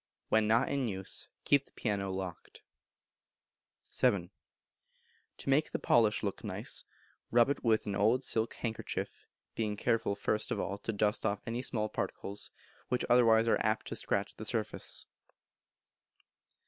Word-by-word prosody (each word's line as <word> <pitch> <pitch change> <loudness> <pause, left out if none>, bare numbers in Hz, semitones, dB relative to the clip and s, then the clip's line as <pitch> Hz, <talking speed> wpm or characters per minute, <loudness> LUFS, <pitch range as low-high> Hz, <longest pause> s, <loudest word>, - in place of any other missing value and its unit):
When 110 -1 +4
not 115 +4 +3
in 140 -3 0
use 95 -3 -4 0.2
keep 140 -1 +4
the - - -23
piano 100 -3 -1
locked. 95 -2 -6 1.3
vii. 90 -2 +2 1.1
To - - -6
make 150 +3 +3
the - - -1
polish 110 -2 +3
look 100 -2 -3
nice, - - -2 0.5
rub 120 +3 +5
it - - -3
with 110 -2 +3
an 100 - -2
old 110 +6 +3
silk 110 -2 +1
handkerchief, 110 -2 -4 0.3
being 105 -2 -2
careful 115 -3 +1
first 105 +1 0
of - - -1
all 100 +1 -3
to 115 - -2
dust 105 0 +1
off 105 -1 -1
any 120 +1 -2
small 110 -4 0
particles, 100 -1 -3 0.4
which 125 - 0
otherwise 115 -2 +6
are - - +3
apt 110 0 +1
to - - -4
scratch 100 0 0
the 110 - -7
surface. 110 0 -2
110 Hz, 150 wpm, -32 LUFS, 100-120 Hz, 1.3 s, otherwise